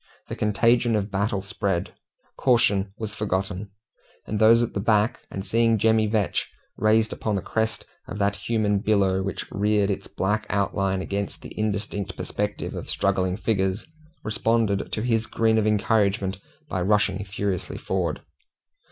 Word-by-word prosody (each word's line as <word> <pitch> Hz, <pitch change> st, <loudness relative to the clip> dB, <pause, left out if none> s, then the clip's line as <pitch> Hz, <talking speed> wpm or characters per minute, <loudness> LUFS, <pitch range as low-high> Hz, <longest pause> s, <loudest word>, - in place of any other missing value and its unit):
The -, -, -3 dB
contagion 115 Hz, +3 st, +2 dB
of 105 Hz, -1 st, -1 dB
battle 100 Hz, 0 st, 0 dB
spread. 95 Hz, -3 st, -2 dB, 0.4 s
Caution 110 Hz, -6 st, +2 dB
was 110 Hz, -2 st, -4 dB
forgotten; 100 Hz, -1 st, -2 dB, 0.6 s
and 105 Hz, -, -3 dB
those 115 Hz, +2 st, +6 dB
at 120 Hz, -, -3 dB
the -, -, -2 dB
back, 105 Hz, +2 st, +2 dB, 0.2 s
seeing 115 Hz, +3 st, +2 dB
Jemmy 110 Hz, 0 st, +3 dB
Vetch 105 Hz, -2 st, 0 dB, 0.3 s
raised 110 Hz, +1 st, +3 dB
upon 110 Hz, -2 st, -2 dB
the 95 Hz, -, -1 dB
crest 110 Hz, 0 st, -1 dB, 0.2 s
of 105 Hz, -, -6 dB
that 100 Hz, 0 st, +1 dB
human 105 Hz, -2 st, 0 dB
billow 95 Hz, -2 st, +2 dB
which 95 Hz, -1 st, -3 dB
reared 105 Hz, 0 st, +2 dB
its 100 Hz, -, -4 dB
black 105 Hz, +3 st, -1 dB
outline 95 Hz, -1 st, 0 dB
against 100 Hz, +1 st, -4 dB
an -, -, -8 dB
indistinct 105 Hz, -2 st, -2 dB
perspective -, -, -3 dB
of -, -, -6 dB
struggling 95 Hz, 0 st, +1 dB
figures, 95 Hz, -3 st, 0 dB, 0.4 s
responded 110 Hz, -2 st, 0 dB
to 110 Hz, -, -2 dB
his 115 Hz, -2 st, +1 dB
grin 110 Hz, -1 st, +2 dB
of 110 Hz, -, +1 dB
encouragement 100 Hz, -2 st, +1 dB, 0.3 s
by 95 Hz, -, -2 dB
rushing 100 Hz, 0 st, +2 dB
furiously 100 Hz, -2 st, -3 dB
forward. 90 Hz, -5 st, -2 dB
105 Hz, 145 wpm, -25 LUFS, 95-110 Hz, 0.6 s, those